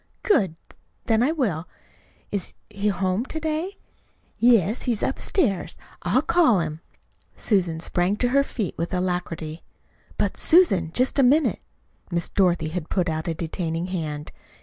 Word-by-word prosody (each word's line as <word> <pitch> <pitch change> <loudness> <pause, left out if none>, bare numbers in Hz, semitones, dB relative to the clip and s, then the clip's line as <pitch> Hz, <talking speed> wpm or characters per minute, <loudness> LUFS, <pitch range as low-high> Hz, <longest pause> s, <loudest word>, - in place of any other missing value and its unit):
"Good! 210 - +2 0.5
Then 225 -1 +2
I 265 +5 +3
will. 200 - -1 0.6
Is 200 -3 -3 0.2
is 200 -1 -11
he 210 - +3
at 200 - -1
home 185 +3 0
to 315 - -4
day?" 320 +5 -2 0.6
"Yes, 230 -2 +4
he's 235 -4 -1
upstairs. 215 - 0 0.2
I'll 200 +11 +2
call 320 - +4
him." 160 -1 -3 0.6
Susan 180 -6 +1
sprang 175 +4 0
to 245 +3 0
her 280 +2 +4
feet 215 - -4
with 170 +3 -2
alacrity. 175 -3 -3 0.6
"But, - - 0
Susan, 200 - +4
just 255 - +1
a - - +7
minute!" 285 +5 +3 0.5
Miss 170 -1 -2
Dorothy 175 -5 +2
had 165 -1 -5
put 180 -3 0
out 160 +1 -3
a 165 - -1
detaining 165 +1 -3
hand. 150 -4 -4
190 Hz, 150 wpm, -24 LUFS, 170-250 Hz, 0.6 s, a